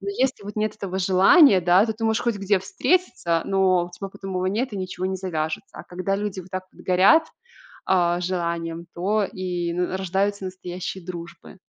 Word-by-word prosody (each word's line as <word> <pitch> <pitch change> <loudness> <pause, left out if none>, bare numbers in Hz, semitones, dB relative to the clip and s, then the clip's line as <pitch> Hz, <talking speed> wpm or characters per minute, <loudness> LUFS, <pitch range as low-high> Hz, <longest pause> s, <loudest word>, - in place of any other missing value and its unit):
Но 200 - -6
если 255 +1 -1
вот 205 +1 -8
нет 215 0 -1
этого 190 -2 -4
желания, 195 - +6
да, 180 +5 +5
то 220 - -1
ты 225 - -5
можешь 220 0 +1
хоть 235 -3 0
где 200 0 +1
встретиться, 185 - 0
но 185 -2 +2
у - - -13
тебя 195 +3 -7
потом 195 -1 -8
его 185 0 -1
нет 225 +6 -1
и - - -4
ничего 185 -1 -4
не 190 0 -2
завяжется. 160 +2 -4
А - - -8
когда 185 +2 -2
люди 205 -2 -3
вот 185 +1 -14
так 185 0 -4
вот - - -16
горят, 195 - +5 0.6
а-а, 175 -2 +2
желанием, 170 -2 -3
то 205 +4 +1
и 180 -4 -3
н 175 - -2
н - - -2
рождаются 195 +1 -1
настоящие 185 0 -6
дружбы. 170 0 -9
190 Hz, 200 wpm, -23 LUFS, 180-200 Hz, 0.6 s, желания